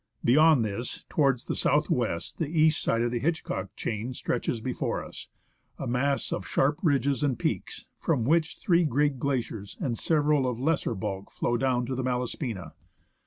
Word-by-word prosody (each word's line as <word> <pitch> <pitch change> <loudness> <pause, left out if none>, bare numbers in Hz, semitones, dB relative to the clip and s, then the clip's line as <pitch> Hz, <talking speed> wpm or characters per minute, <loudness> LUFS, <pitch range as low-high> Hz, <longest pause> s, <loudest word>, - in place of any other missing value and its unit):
Beyond 150 -1 +5
this, 105 +4 -5
towards 135 -5 +2
the - - -2
south 150 +1 +2
west, 110 -9 -1
the 160 - 0
east 155 0 +3
side 115 +1 +1
of 120 - 0
the 120 - -1
Hitchcock 130 - -2
chain 115 +4 -3
stretches 120 -1 -2
before 125 +2 -2
us, - - -10 0.5
a - - -4
mass 135 +3 0
of - - -4
sharp 145 +2 +1
ridges 140 -4 +2
and 140 -5 +1
peaks, - - -3
from 140 -9 +1
which 155 +2 +2
three 175 -1 +3
great 145 -2 +1
glaciers 120 -7 -3
and 125 -4 -1
several 150 -1 +2
of 120 -2 -4
lesser 140 -4 0
bulk 95 0 -4
flow 120 - -1
down 125 0 +1
to 130 - -3
the 130 - -2
Malaspina. 125 - -3
130 Hz, 170 wpm, -28 LUFS, 120-150 Hz, 0.5 s, Beyond